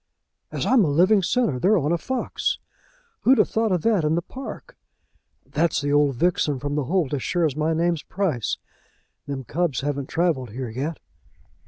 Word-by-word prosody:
As - - -2
I'm 255 -5 +5
a 160 - +1
living 185 +8 +4
sinner, 185 - +1
they're 205 - +4
on 150 -2 0
a 170 - +2
fox! 260 +6 -2 0.6
Who'd 260 +2 +4
have 210 - +3
thought 220 -1 +1
of 180 -3 0
that 215 -7 +3
in 150 +1 +2
the 170 - -1
park? 270 - -9 0.7
That's 160 +2 0
the 145 0 -1
old 145 -2 +3
vixen 155 -1 +1
from 145 +2 -4
the 145 -2 -1
holt, 165 -2 0
as 140 - -1
sure 175 +4 +1
as 145 -4 -1
my 155 +1 0
name's 170 -1 +1
Price. 165 - -2 0.7
Them 140 -2 -4
cubs 160 +2 -1
haven't 140 -1 -3
travelled 160 -8 0
here 130 0 -4
yet." 145 +7 -3
160 Hz, 185 wpm, -24 LUFS, 145-185 Hz, 0.7 s, I'm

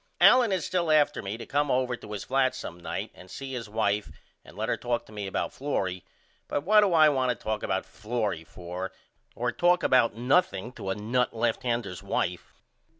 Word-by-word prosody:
Allen 250 -4 +7
is 185 -4 0
still 175 -3 0
after 150 -1 +3
me 100 +3 -4
to 115 - -8
come 145 0 0
over 125 -1 +1
to 105 - -12
his 105 - -4
flat 130 0 +1
some 85 - -7
night 85 - -4
and 90 - -14
see 135 +5 -7
his 115 -4 -5
wife 105 -1 0 0.3
and - - -15
let - - -2
her - - +1
talk 120 -1 -2
to - - -16
me 105 -2 -5
about 95 - -2
Florrie 95 - -2 0.4
but 145 - -2
what 210 +5 +6
do 200 -2 +3
I 160 -2 +7
want 130 -4 +2
to 125 - +1
talk 110 0 -3
about 95 0 -1
Florrie 105 -3 -3
for 90 +3 -6 0.4
or 120 +1 -1
talk 175 +4 +3
about 115 -4 +4
nothing 120 - +1
to 95 - -6
a 95 - 0
nut 120 +4 0
left 115 0 0
hander's 115 -8 -2
wife? - - -2
120 Hz, 210 wpm, -28 LUFS, 100-140 Hz, 0.4 s, Allen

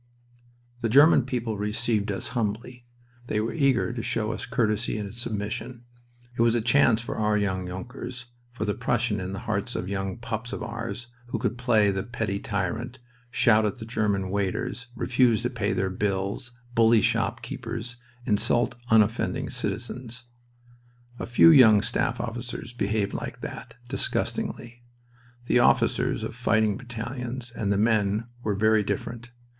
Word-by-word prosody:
The 115 - 0
German 140 +1 +6
people 115 -5 -2
received 105 0 0
us 100 - -3
humbly. 120 +1 -3 0.4
They 105 - 0
were 110 +2 -1
eager 135 -5 +2
to 120 - -3
show 110 -1 -1
us 110 - -5
courtesy 115 -2 0
and 105 -1 -5
submission. 115 +1 -4 0.5
It - - 0
was 115 0 +4
a - - +3
chance 115 -1 +4
for 115 - -5
our 105 -1 +2
young 95 -3 -1
Junkers, 120 +6 -7 0.3
for 120 -3 -4
the 105 - 0
Prussian 115 -3 0
in 95 0 -4
the 100 - -4
hearts 110 +1 -2
of 90 - -3
young 95 +1 -3
pups 115 +1 -5
of - - -4
ours, 115 -1 -5 0.2
who - - -2
could 120 -2 -1
play 115 -5 +3
the 95 0 -2
petty 105 -2 -3
tyrant, 110 +6 -3 0.3
shout 115 -3 +4
at 105 +4 -1
German 100 -5 0
waiters, 100 +6 -2
refuse 120 -2 +2
to 125 - -1
pay 110 -4 -1
their 95 0 0
bills, 100 +4 -2 0.2
bully 115 -1 +5
shopkeepers, 120 +4 -2 0.3
insult 115 +3 +2 0.2
unoffending 115 +5 +2
citizens. 120 +1 -4 1.0
A - - -4
few 120 +8 +7
young 110 -9 +7
staff - - 0
officers 120 0 -5
behaved 105 -2 -1
like - - -5
that, - - -7
disgustingly. 120 0 -2 0.6
The 125 - +3
officers - - +2
of - - -4
fighting 110 -3 +2
battalions 120 +1 -5
and 105 -4 -2
the 100 - +2
men 105 0 +2 0.2
were 105 -4 -1
very 110 +1 +4
different. 115 +4 -4
115 Hz, 150 wpm, -26 LUFS, 105-120 Hz, 1.0 s, few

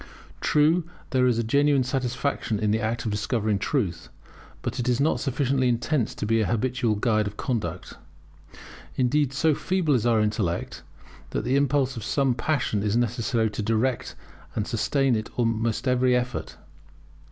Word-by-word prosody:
True 155 +4 +3 0.3
there 130 -1 +3
is 120 -2 +2
a 115 - +1
genuine 140 +3 +3
satisfaction 130 -2 -1
in 105 0 0
the 110 - +2
act 115 +1 -2
of 110 - -1
discovering 105 -1 0
truth; 95 - -2 0.5
but - - -3
it 125 +1 0
is 125 0 +1
not 150 +3 +2
sufficiently 135 -1 +1
intense 120 +1 0
to - - -4
be 115 +1 +2
an 110 - 0
habitual 120 -1 0
guide 110 -1 +1
of 105 - -7
conduct. 95 -9 -3 1.0
Indeed, 135 +2 +2
so 155 +3 +2
feeble 180 0 0
is 120 -2 +2
our 115 -2 +3
intellect, 105 -5 -1 0.5
that - - -2
the 130 - +1
impulse 140 -2 +1
of 110 - -5
some 135 +3 +1
passion 120 -6 -1
is 105 +2 +1
necessary 115 -2 0
to 105 - -4
direct 115 +4 -1 0.4
and - - -1
sustain 135 -3 +1
it 110 0 -2
in - - -21
almost 115 +1 0
every 125 0 +3
effort. 125 -1 -3
120 Hz, 165 wpm, -25 LUFS, 110-135 Hz, 1.0 s, True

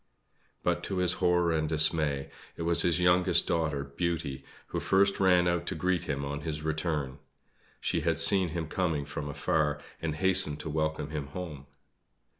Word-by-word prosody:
But - - 0
to 95 - -3
his 90 -1 +3
horror 90 -1 +2
and 80 -1 -1
dismay, 75 -3 +2 0.3
it - - -4
was 85 0 +4
his 85 0 +1
youngest 90 0 +3
daughter, 80 -4 -1
Beauty, 70 -1 -4 0.3
who - - -3
first 100 +1 +2
ran 90 -2 +4
out 85 0 -1
to - - -2
greet 90 -1 -1
him 70 -1 -3
on 70 +1 -5
his 75 0 -5
return. 75 -4 -2 0.6
She - - -1
had 85 -1 0
seen 95 +3 +7
him 80 -1 -4
coming 80 -4 -1
from 75 0 -6
afar, 75 +1 -1 0.2
and 80 -2 -2
hastened 95 -4 +1
to 80 - -5
welcome 80 -1 -2
him 75 -3 -4
home. 75 -3 -8
80 Hz, 170 wpm, -29 LUFS, 75-90 Hz, 0.6 s, seen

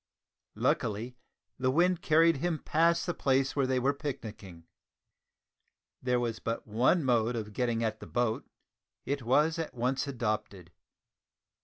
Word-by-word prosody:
Luckily 115 +3 -1 0.4
the 130 0 +1
wind 175 +5 +2
carried 165 0 +4
him 170 +3 -1
past 165 +3 +2
the 175 - -1
place 135 -2 +1
where 140 -2 +2
they 130 0 +1
were 135 +3 +2
picnicking. 110 - -7 1.4
There 125 -1 +1
was 115 -2 -2
but 115 0 -3
one 125 +10 +2
mode 120 -2 +2
of 105 -2 -5
getting 120 0 0
at 110 -1 -2
the - - -10
boat. 120 -2 -1 0.6
It 140 0 -2
was 150 +7 +2
at 160 - -4
once 130 +4 -1
adopted. 105 -8 -3
125 Hz, 140 wpm, -30 LUFS, 115-145 Hz, 1.4 s, carried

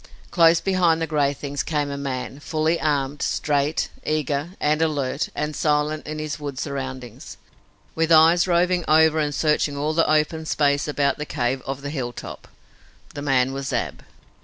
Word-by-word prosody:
Close 165 -1 +5
behind 180 -4 +2
the 165 - 0
gray 150 -3 +1
things 140 -1 -4
came 145 0 -2
a - - -3
man, 135 -1 -4
fully 155 +2 -1
armed, 145 -2 -1
straight, 145 +1 0
eager 150 0 -1
and 150 +1 +1
alert 145 -4 -1
and 150 0 -3
silent 150 +1 0
in 155 0 -4
his 155 -1 -4
wood 145 -3 -6
surroundings, 130 -4 -6 0.6
with 165 0 0
eyes 165 +3 +6
roving 180 0 +2
over 160 0 +4
and 145 -2 -1
searching 150 -2 +1
all 150 +2 -1
the 165 0 +2
open 155 +1 +1
space 145 -2 +1
about 145 -1 0
the - - -2
cave 130 -2 -1
of 135 +1 -4
Hilltop. 135 -4 -6 0.7
The 145 - -6
man 135 -2 +1
was 135 0 -4
Ab. - - -3
150 Hz, 160 wpm, -23 LUFS, 140-155 Hz, 0.7 s, eyes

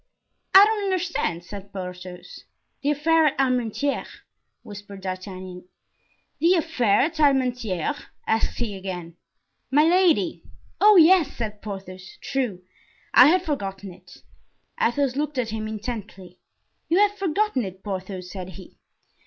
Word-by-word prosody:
"I 390 +1 +11
don't 425 -1 -1
understand," 350 - -1
said 200 +2 -10
Porthos. 180 -1 -9 0.4
"The 285 - 0
affair 315 +2 +3
at 280 - -1
Armentieres," 255 +1 0 0.6
whispered 205 -1 -10
D'Artagnan. 185 -1 -7 0.7
"The 340 +4 +4
affair 260 - +2
at 310 +3 -1
Armentieres?" 255 - +1 0.2
asked 220 0 0
he 225 -4 -3
again. 180 -3 -7 0.5
"Milady." 330 +3 +3 0.4
"Oh, 425 0 +7
yes!" 335 -3 +5
said 210 -3 -5
Porthos; 190 -3 -9
"true, 240 -10 -3 0.5
I 250 - +9
had 355 +3 +3
forgotten 195 - -4
it!" - - -18 0.6
Athos 260 +1 +1
looked 295 0 -2
at 240 -3 -1
him 215 -1 -4
intently. 210 -5 -7 0.5
"You 335 - +3
have 410 0 +3
forgotten 390 - 0
it, 190 -1 -8
Porthos?" 185 -2 -6
said 185 -2 -7
he. 190 - -13
235 Hz, 125 wpm, -24 LUFS, 190-305 Hz, 0.7 s, I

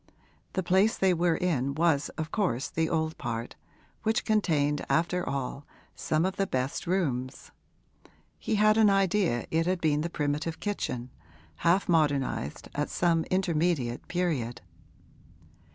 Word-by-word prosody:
The 190 - -1
place 190 +5 +3
they 190 -1 +3
were 170 -1 +2
in 140 -6 0
was 160 -3 +2
of 160 0 -4
course 145 - 0
in - - -26
the 160 - 0
old 160 -1 -1
part, 115 -1 -4 0.5
which 220 0 0
contained 150 -9 +1
after 175 +2 +1
all 140 +1 -4 0.3
some 155 +2 0
of 190 +1 -2
the 195 - +1
best 130 +2 -2
rooms: 135 -9 -2 0.9
he 220 - -1
had 215 +1 +4
an 215 -2 +6
idea 195 - +2
it 165 +1 +1
had 185 0 +1
been 150 -3 +1
the 170 - -2
primitive 150 +1 -2
kitchen, 125 - -3 0.5
half 175 +4 +2
modernised 145 - 0
at 145 +1 -2
some 165 -2 +1
intermediate 170 -9 0
period. 145 -10 -1
165 Hz, 140 wpm, -28 LUFS, 140-185 Hz, 0.9 s, an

